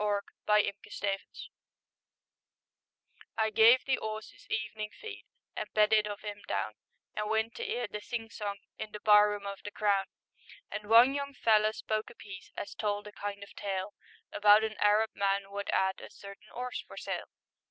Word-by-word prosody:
THE 210 - +1 0.4
ARAB 210 -1 +4 0.2
STEED 195 -1 -1 2.2
I 220 -1 +2
gave 230 +4 +7
the 270 - +1
'orse 215 0 -5
'is - - -19
evenin' 215 -1 -2
feed, 440 -1 -8 0.3
And 215 - -4
bedded 215 0 +5
of 205 0 -6
'im 205 -1 -6
down, - - -1 0.4
And 210 0 -2
went 220 +1 +1
to - - -4
'ear 245 0 -1
the 210 0 -6
sing 225 0 -5
song 200 -2 -4 0.2
In 215 - -6
the 210 - -5
bar 210 0 +7
room 205 -1 -4
of 200 0 -5
the - - -5
Crown, 200 -2 +1 0.7
And 210 0 -5
one 235 +4 +8
young 280 0 -3
feller 215 -2 +4
spoke 215 0 -3
a - - -14
piece 190 -2 -10
As - - -5
told 205 -1 -2
a 210 - -8
kind 200 0 -5
of 200 - -13
tale, 195 0 -3 0.4
About 210 +1 +6
an 220 0 -1
Arab 210 +1 +4
man 195 0 0
wot 200 0 -4
'ad 190 0 +1
A - - -9
certain 200 +1 -12
'orse 250 0 -4
for - - -12
sale. - - -4
210 Hz, 180 wpm, -31 LUFS, 205-220 Hz, 2.2 s, one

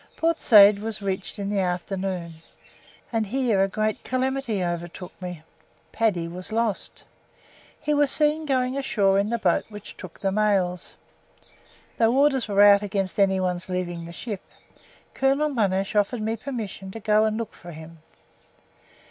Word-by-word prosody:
Port 330 0 +1
Said 205 -2 +7
was 215 -1 -5
reached 190 +1 -3
in 200 0 -3
the 205 - 0
afternoon, 180 -2 -3 0.7
and 220 -2 0
here 235 -4 +1
a - - +2
great 215 +2 -2
calamity 255 -5 -1
overtook 175 +1 -5
me. 180 -3 -7 0.5
Paddy 195 -7 0
was 180 +4 -7
lost! 225 -3 -2 0.8
He 300 0 -1
was 290 -1 +3
seen 305 +1 +2
going 255 -1 +1
ashore 205 -8 +2
in 200 +1 0
the 235 - 0
boat - - +1
which 210 -1 -10
took 185 -3 -11
the 195 - 0
mails. 195 -4 0 1.0
Though 230 +3 +3
orders 275 -4 +3
were 200 -1 +4
out 200 -1 +7
against 195 -1 -3
any 190 -1 +3
one's 180 0 -2
leaving 175 -2 -3
the - - -9
ship, 205 +2 -6 0.7
Colonel 275 +3 +2
Monash 195 -7 0
offered 210 +2 +1
me 220 +1 -1
permission 220 -6 -6
to 225 - -8
go 215 0 +3
and 215 0 0
look 230 -2 -5
for 175 - -11
him. 160 +1 -11
205 Hz, 155 wpm, -24 LUFS, 185-230 Hz, 1.0 s, Said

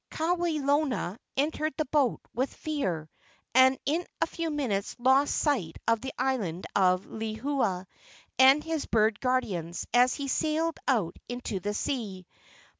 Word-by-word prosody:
Kawelona 305 - 0 0.2
entered 305 +1 0
the 310 - 0
boat 270 -3 +1
with 260 +4 -1
fear, 190 - -3 0.5
and 260 +1 +6
in 320 +5 +1 0.2
a - - +3
few 335 -2 -4
minutes 245 -10 -2
lost 265 +3 +3
sight 230 - 0
of 230 -1 +3
the 265 - -4
island 225 -10 -1
of 185 -1 +3
Lehua 220 -3 -2 0.5
and 270 +3 +7
his 325 -2 -3
bird 215 -1 +2
guardians 195 -10 -1
as 250 +1 +5
he 280 -1 -4
sailed 315 +3 0
out 205 -10 +1
into 245 -5 -3
the 205 +3 -3
sea. 205 -8 -3
255 Hz, 135 wpm, -28 LUFS, 205-290 Hz, 0.5 s, and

